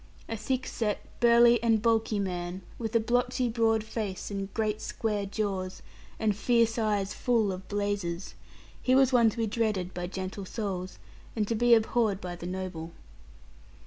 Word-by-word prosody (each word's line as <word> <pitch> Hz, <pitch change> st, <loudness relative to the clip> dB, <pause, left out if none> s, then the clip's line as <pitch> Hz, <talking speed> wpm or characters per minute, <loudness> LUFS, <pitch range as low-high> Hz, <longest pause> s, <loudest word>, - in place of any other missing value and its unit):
A 225 Hz, -, -3 dB
thick 255 Hz, +4 st, -2 dB
set, 210 Hz, -3 st, -2 dB
burly, 235 Hz, -1 st, +6 dB
and 225 Hz, -2 st, +3 dB
bulky 225 Hz, -1 st, +2 dB
man, 180 Hz, -1 st, -3 dB, 0.2 s
with 225 Hz, -1 st, -3 dB
a -, -, +6 dB
blotchy 245 Hz, +2 st, +1 dB
broad 225 Hz, -1 st, +2 dB
face, 215 Hz, -3 st, -4 dB
and 195 Hz, -1 st, -4 dB
great 215 Hz, -1 st, -1 dB
square 210 Hz, -3 st, -2 dB
jaws, 195 Hz, -3 st, -3 dB, 0.3 s
and 215 Hz, -2 st, +1 dB
fierce 230 Hz, +1 st, +2 dB
eyes 205 Hz, -3 st, 0 dB
full 230 Hz, -5 st, +1 dB
of 185 Hz, 0 st, -7 dB
blazes; 200 Hz, -4 st, -2 dB, 0.5 s
he 255 Hz, -, +3 dB
was 265 Hz, -1 st, +5 dB
one 235 Hz, -2 st, +6 dB
to 215 Hz, -, -8 dB
be 230 Hz, -, +1 dB
dreaded 210 Hz, -4 st, -1 dB
by 175 Hz, 0 st, -4 dB
gentle 190 Hz, +1 st, -5 dB
souls, 185 Hz, -3 st, -4 dB, 0.4 s
and 215 Hz, -2 st, 0 dB
to 230 Hz, -, 0 dB
be 235 Hz, +1 st, +5 dB
abhorred 220 Hz, -2 st, +1 dB
by 180 Hz, -3 st, -5 dB
the 175 Hz, 0 st, -7 dB
noble. 180 Hz, -3 st, -5 dB
215 Hz, 165 wpm, -29 LUFS, 190-230 Hz, 0.5 s, burly